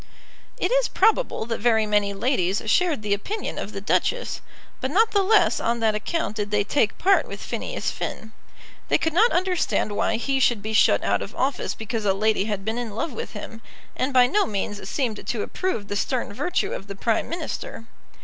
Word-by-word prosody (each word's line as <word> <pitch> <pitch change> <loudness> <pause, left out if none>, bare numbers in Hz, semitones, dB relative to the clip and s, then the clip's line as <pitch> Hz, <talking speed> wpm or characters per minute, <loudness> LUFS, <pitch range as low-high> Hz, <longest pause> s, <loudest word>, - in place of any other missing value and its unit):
It - - 0
is - - +3
probable 445 - +2
that 230 -1 -3
very 220 -2 +3
many 205 -1 +1
ladies 200 -3 0
shared 300 +1 +2
the 205 -1 +1
opinion 400 - -3
of - - -5
the - - -6
Duchess; - - 0 0.4
but 260 - -2
not 435 +8 +3
the 405 - +3
less 420 +3 +4
on 235 0 0
that 220 -1 +3
account 215 +2 -2
did 205 -1 -2
they 205 -1 +2
take 215 +1 +1
part 390 +1 +3
with - - -7
Phineas - - -3
Finn. 220 - -5 0.6
They - - +4
could 320 - -1
not 440 +8 +5
understand 360 - +1
why 205 - 0
he 270 +4 0
should 240 -5 +2
be 220 +1 -3
shut 215 - +4
out - - +1
of - - -7
office 265 0 -1
because 220 0 -4
a 195 -1 +3
lady 215 0 +1
had 205 -3 -3
been 220 +2 -1
in 225 -4 -5
love 270 +5 -2
with - - -6
him, 225 +2 -8 0.3
and 260 +2 -1
by 250 -2 +6
no 410 +11 +2
means 205 0 -4
seemed 240 -7 -2
to 225 - -1
approve 365 - -3
the 205 - -3
stern 240 +2 -1
virtue 360 - -1
of 195 - -6
the 200 - -6
Prime 225 +3 0
Minister. 320 -8 -5
230 Hz, 205 wpm, -24 LUFS, 210-330 Hz, 0.6 s, by